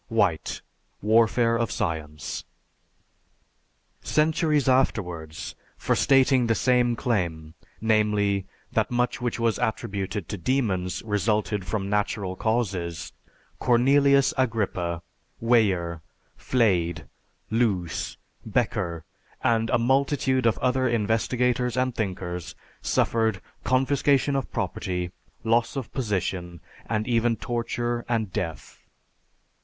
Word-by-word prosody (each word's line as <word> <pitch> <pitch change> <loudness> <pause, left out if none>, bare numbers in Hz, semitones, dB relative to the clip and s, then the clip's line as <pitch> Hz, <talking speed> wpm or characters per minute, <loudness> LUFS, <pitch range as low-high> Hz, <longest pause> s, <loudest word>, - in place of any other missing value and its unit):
(White: 100 -9 0 0.4
"Warfare 115 +2 +4
of 115 -1 0
Science.") 75 -2 -3 1.6
Centuries 155 -1 +2
afterwards, 90 -12 0 0.2
for - - +1
stating 135 -2 +4
the 115 - +2
same 125 0 +3
claim, 85 - -2 0.3
namely, 105 -3 +2 0.2
that - - +1
much 125 +2 0
which 120 -1 -2
was 115 -1 +1
attributed 105 -5 -2
to 100 - -5
demons, 95 -6 0
resulted 105 -2 0
from 95 +1 -2
natural 100 -2 -1
causes, 95 -7 -2 0.5
Cornelius 140 +3 +4
Agrippa, 95 -8 -1 0.4
Weyer, 95 -8 +2 0.3
Flade, 85 - +1 0.5
Loos, 105 -7 0 0.3
Bekker, 85 -2 -1 0.4
and 115 -1 +2
a - - +3
multitude 130 0 +2
of 115 - +2
other 130 0 +1
investigators 120 +2 +1
and 130 0 +1
thinkers, 90 -5 -4 0.3
suffered 110 -4 +1 0.2
confiscation 140 +1 +2
of 135 -2 -2
property, 90 -1 -2 0.3
loss 115 +3 +2
of 135 -5 -5
position, 95 -7 -2 0.3
and 110 -1 -1
even 115 -1 +2
torture 120 0 -2
and 110 -5 -1
death. 80 -4 -4
110 Hz, 100 wpm, -26 LUFS, 95-125 Hz, 1.6 s, Warfare